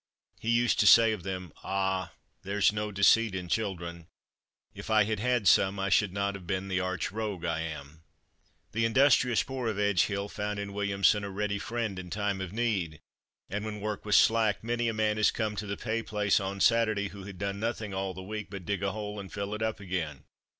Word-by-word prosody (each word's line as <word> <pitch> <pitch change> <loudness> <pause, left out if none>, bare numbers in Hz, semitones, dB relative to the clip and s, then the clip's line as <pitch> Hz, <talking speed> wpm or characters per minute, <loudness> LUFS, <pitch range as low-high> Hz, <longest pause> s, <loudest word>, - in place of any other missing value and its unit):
He 115 - -4
used 120 +1 +3
to - - +5
say 115 -1 +8
of 105 -4 -3
them, 90 -2 -5
"Ah, 95 -1 -1 0.3
there's 100 +2 +2
no 105 0 -2
deceit 100 +1 +4
in 90 -1 -4
children. 85 -5 -3 0.7
If - - -9
I 110 -1 +5
had 110 0 -2
had 120 -2 +1
some, 95 +2 +4
I 95 0 0
should 105 -1 +3
not 100 +1 -1
have 95 -3 -9
been 95 +1 -2
the 90 -1 0
arch 95 0 -2
rogue 105 -5 -4
I 80 -1 -1
am.". 80 -1 -7 0.7
The 115 +1 0
industrious 125 0 +4
poor 130 -3 -4
of 110 -2 -2
Edge 100 -3 +3
hill 100 -1 -3
found 105 0 -4
in 100 0 -5
Williamson 100 0 +2
a 100 - -4
ready 100 +1 -2
friend 115 -5 -3
in 90 -1 -8
time 100 0 -2
of 95 -2 -5
need, 100 -9 -1 0.5
and 105 +2 -4
when 110 -1 -5
work 105 0 -4
was 105 -1 +4
slack 110 -2 +3
many 120 +1 -1
a 115 - 0
man 110 0 +1
has 110 - +4
come 110 -2 -2
to 105 - -4
the 100 - -3
pay 115 0 -2
place 105 -3 +1
on 100 0 -4
Saturday, 110 -3 +3
who 100 -1 -10
had 100 -2 -9
done 100 +1 -3
nothing 110 -2 -3
all 95 -1 -3
the 95 - -7
week 105 +2 -6
but 95 -3 -8
dig 100 -2 -2
a 100 -1 -1
hole 105 -1 -5
and 95 -2 -8
fill 100 0 -4
it 105 - -4
up 110 -1 -1
again. 85 -8 -4
100 Hz, 220 wpm, -29 LUFS, 95-110 Hz, 0.7 s, say